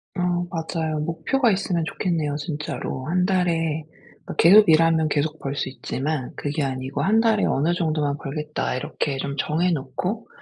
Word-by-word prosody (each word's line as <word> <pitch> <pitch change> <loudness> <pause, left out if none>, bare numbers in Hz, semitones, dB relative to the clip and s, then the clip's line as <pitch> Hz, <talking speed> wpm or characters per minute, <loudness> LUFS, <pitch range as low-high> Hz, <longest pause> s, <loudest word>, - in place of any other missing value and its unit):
어 - - -4 0.3
맞아요. 160 -2 -2
목표가 170 - +1
있으면 185 -4 0
좋겠네요 160 -5 -1
진짜로. 150 -3 -4
1 180 +3 +1
달에 165 -4 +1 0.4
그러니까 - - -6
계속 200 +4 +7
일하면 160 0 +4
계속 155 +2 -1
벌 140 0 -4
수 135 - -2
있지만 135 +1 -3
그게 145 +1 -2
아니고 130 +1 -3
'1 210 +9 +3
달에 225 -2 +3
어느 155 +6 +1
정도만 155 -4 0
벌겠다.' 150 +1 -3
이렇게 135 +2 -2
좀 140 +1 -3
정해 170 +6 +1
놓고 160 - -3
160 Hz, 335 characters per minute, -23 LUFS, 145-175 Hz, 0.4 s, 계속